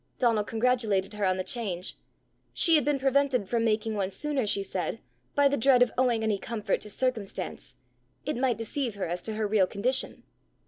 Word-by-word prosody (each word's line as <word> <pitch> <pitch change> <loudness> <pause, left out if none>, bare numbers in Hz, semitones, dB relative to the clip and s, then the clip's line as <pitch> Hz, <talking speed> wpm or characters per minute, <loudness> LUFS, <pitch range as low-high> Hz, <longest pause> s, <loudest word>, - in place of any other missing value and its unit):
Donal 230 -4 +2
congratulated 220 -4 +1
her 210 -1 -1
on 185 0 +1
the 185 - -2
change. 190 -5 -3 0.6
She 330 - +4
had 305 - +6
been 290 +1 +1
prevented 270 -4 +1
from 230 +2 0
making 220 0 0
one 195 -3 -1
sooner, 275 +1 -2
she 200 -1 +1
said, 190 +2 -3 0.4
by 285 0 +5
the 285 +1 +1
dread 250 +1 +5
of 245 - -1
owing 245 -3 +2
any 215 -2 0
comfort 215 -3 -2
to 210 - -6
circumstance: 210 -7 -3 0.5
it 300 - -1
might 245 -2 +1
deceive 230 +1 -2
her 200 - -3
as 175 +1 -3
to 220 - -4
her 215 0 -1
real 200 -3 +3
condition! 255 +7 -1
225 Hz, 190 wpm, -28 LUFS, 200-255 Hz, 0.6 s, had